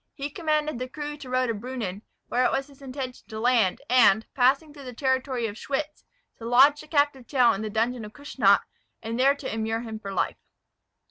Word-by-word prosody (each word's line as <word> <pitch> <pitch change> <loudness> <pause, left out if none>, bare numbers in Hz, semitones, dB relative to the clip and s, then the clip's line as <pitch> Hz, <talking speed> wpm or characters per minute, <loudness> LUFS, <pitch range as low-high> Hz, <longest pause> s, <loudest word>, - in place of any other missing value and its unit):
He 285 +1 -5
commanded 305 -4 -1
the 255 0 -4
crew 295 +2 -5
to 275 -3 -10
row 255 0 +1
to 230 - -1
Brunnen, 215 -4 -5 0.3
where 250 - +1
it - - +3
was 270 0 -1
his 280 -1 -19
intention 260 -1 -6
to 220 -1 -7
land, 230 -5 +2
and, 225 -3 +5
passing 275 +4 +2
through 285 -2 -11
the 250 -2 -8
territory 260 -2 0
of 215 -1 -5
Schwyz, 295 +2 -4 0.4
to 230 - -8
lodge 270 +5 +5
the - - -14
captive 285 -4 +1
Tell 250 -4 +4
in 195 - -4
the 215 - -3
dungeon 230 +2 -1
of 210 - -8
Kussnacht, 240 -8 +2 0.4
and 230 +2 -3
there 275 +2 +5
to 275 -4 -6
immure 225 0 -1
him 220 -2 -6
for 200 -2 -7
life. - - -1
255 Hz, 210 wpm, -26 LUFS, 225-280 Hz, 0.4 s, and